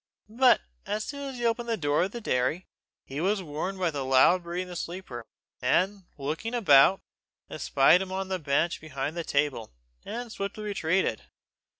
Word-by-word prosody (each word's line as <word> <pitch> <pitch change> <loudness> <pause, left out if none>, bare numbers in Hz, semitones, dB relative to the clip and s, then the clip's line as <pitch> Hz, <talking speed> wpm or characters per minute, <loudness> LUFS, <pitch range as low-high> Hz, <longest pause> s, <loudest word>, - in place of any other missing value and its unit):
But 245 +2 +4 0.3
as 210 +1 -1
soon 280 +1 -5
as 260 - -8
he 240 - -3
opened 235 +1 0
the 225 - 0
door 145 -2 +1
of 190 +2 0
the 235 - -6
dairy, 140 - 0 0.4
he 140 +3 -5
was 195 +2 +1
warned 165 +5 -4
by 180 -3 0
the 140 -2 -3
loud 135 +7 +5
breathing 175 +1 -4
of 180 - -11
the 180 - -7
sleeper, 165 -11 -6 0.3
and 185 +9 +1
looking 155 - -3
about, 185 - +6 0.5
espied 180 - +4
him 190 -1 -5
on 190 0 -3
the 190 -1 -2
bench 150 +3 0
behind 145 0 -4
the 170 - -3
table, 140 - -1 0.3
and 240 0 -6
swiftly 200 +1 -5
retreated. 185 - 0
180 Hz, 180 wpm, -27 LUFS, 145-205 Hz, 0.5 s, about